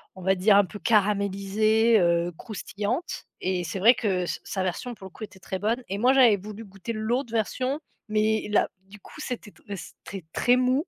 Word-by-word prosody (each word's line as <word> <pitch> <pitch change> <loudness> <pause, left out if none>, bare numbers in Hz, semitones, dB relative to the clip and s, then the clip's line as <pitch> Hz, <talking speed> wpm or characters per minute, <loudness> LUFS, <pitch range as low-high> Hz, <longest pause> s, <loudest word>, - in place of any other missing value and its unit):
on 185 - -10
va 190 +1 +4
dire 200 +3 +4
un 200 - +5
peu 205 +3 -9
caramélisée, 210 +2 +3
heu, 170 -1 +2
croustillante 215 - -4 0.2
et 185 -1 0
c'est 175 - -4
vrai 225 +6 +7
que 200 -7 0
s 175 - -4
sa 190 - -3
version, 185 +7 -3
pour 195 - -12
le 190 - -9
coup, 220 - -10
était 205 -2 -10
très 190 +1 -5
bonne 230 +5 0
et 195 +1 -3
moi 250 +4 +5
j'avais 245 -6 +6
voulu 210 +3 -9
goûter 195 +3 -6
l'autre 230 +3 -1
version, 255 +5 -1 0.3
mais 215 0 +1
là, 210 - +3 0.2
du 210 +2 -13
coup, 295 - -12
c'était 245 -6 -5
t - - -24
c'était 185 +1 -9
très 245 - +4
mou. 255 +5 +1
210 Hz, 205 wpm, -26 LUFS, 190-230 Hz, 0.3 s, vrai